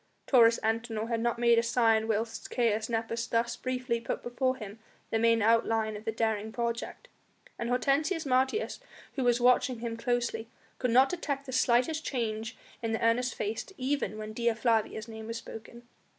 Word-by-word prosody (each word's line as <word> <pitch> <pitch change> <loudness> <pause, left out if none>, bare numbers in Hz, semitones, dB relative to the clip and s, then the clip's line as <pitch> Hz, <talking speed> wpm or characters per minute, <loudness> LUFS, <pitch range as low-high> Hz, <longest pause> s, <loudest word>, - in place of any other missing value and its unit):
Taurus 235 -3 +5
Antinor 225 0 -1
had 230 -1 0
not 235 +1 0
made 235 -1 +4
a - - +3
sign 230 -2 +2
whilst 225 +1 -2
Caius 225 -2 0
Nepos 230 0 -2
thus 235 +1 0
briefly 250 -2 -2
put - - -4
before 255 +2 0
him 215 -3 -9 0.3
the 225 - +1
main 230 -1 +3
outline 225 -1 +2
of 210 +1 -9
the 225 - 0
daring 220 -1 -1
project, 235 - -4 0.5
and 235 - -2
Hortensius 285 +7 +1
Martius, 265 - +1 0.3
who 265 - -2
was 240 0 +3
watching 250 +1 +3
him 230 0 -4
closely, 235 -1 -1 0.3
could 250 - 0
not 260 +3 +5
detect 285 -6 -3
the 260 - -7
slightest 255 +5 +2
change 220 -3 -3 0.2
in 225 -1 -2
the 225 - 0
earnest 245 +2 +2
face 215 +2 -2
even 260 -6 -1
when 215 0 -6
Dea 235 +1 +1
Flavia's 225 -1 0
name 220 -1 -8
was 230 0 -4
spoken. 230 +1 -10
230 Hz, 175 wpm, -30 LUFS, 225-250 Hz, 0.5 s, Taurus